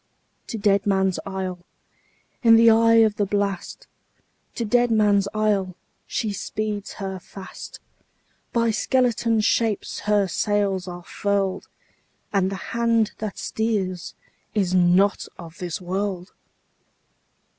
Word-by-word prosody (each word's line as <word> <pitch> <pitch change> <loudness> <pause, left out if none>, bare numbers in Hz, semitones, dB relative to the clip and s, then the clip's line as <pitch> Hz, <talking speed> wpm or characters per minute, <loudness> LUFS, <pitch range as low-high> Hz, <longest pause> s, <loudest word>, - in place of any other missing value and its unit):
To 225 - -4
Deadman's 195 -2 +2
Isle, 190 -2 -4 0.8
in 230 -2 +7
the 230 0 +7
eye 230 0 +5
of 210 -1 -1
the 205 - +1
blast, 200 - -2 0.7
To 235 - -2
Deadman's 215 -4 +3
Isle, 205 -4 0 0.3
she 215 -2 -2
speeds 210 +1 -4
her 190 -2 -5
fast; 190 +1 -10 0.7
By 230 -2 +2
skeleton 230 -1 +1
shapes 215 0 0
her 205 -1 +4
sails 200 -1 0
are 175 -1 -7
furled, 200 0 -1 0.7
And 190 -2 +2
the - - -3 0.2
hand 230 -2 +2
that 215 -2 -4
steers 195 -6 -2 0.4
is 190 -4 +1
not 185 +2 +3
of 165 -1 -11
this 175 -3 -4
world! 185 0 -3
205 Hz, 115 wpm, -23 LUFS, 190-220 Hz, 0.8 s, in